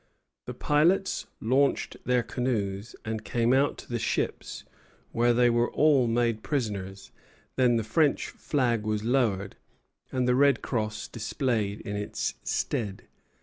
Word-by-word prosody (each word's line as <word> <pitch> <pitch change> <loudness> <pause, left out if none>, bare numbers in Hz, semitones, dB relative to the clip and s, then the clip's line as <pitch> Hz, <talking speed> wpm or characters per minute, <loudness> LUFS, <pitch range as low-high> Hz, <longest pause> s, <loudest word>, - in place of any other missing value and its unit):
The - - -6
pilots 170 +7 +2
launched 135 +5 +1
their 125 -1 +2
canoes 110 -3 -2
and 110 -1 -3
came 120 +2 +1
out 140 +2 +2
to - - -11
the 120 -1 -2
ships, - - -2 0.5
where 120 +1 +3
they 120 +1 +4
were 120 0 +2
all 145 -5 +4
made 115 -1 +1
prisoners; 100 -9 -3 0.4
then 125 -2 +3
the 115 - +1
French 145 +7 +1
flag 120 -6 0
was 105 0 -2
lowered, 110 -5 0 0.5
and 130 -1 0
the 125 - +4
red 140 -1 +3
cross 110 -3 -2
displayed 110 -3 -2
in 105 - -5
its 105 0 -3
stead. 100 -4 -2
120 Hz, 140 wpm, -27 LUFS, 110-130 Hz, 0.5 s, they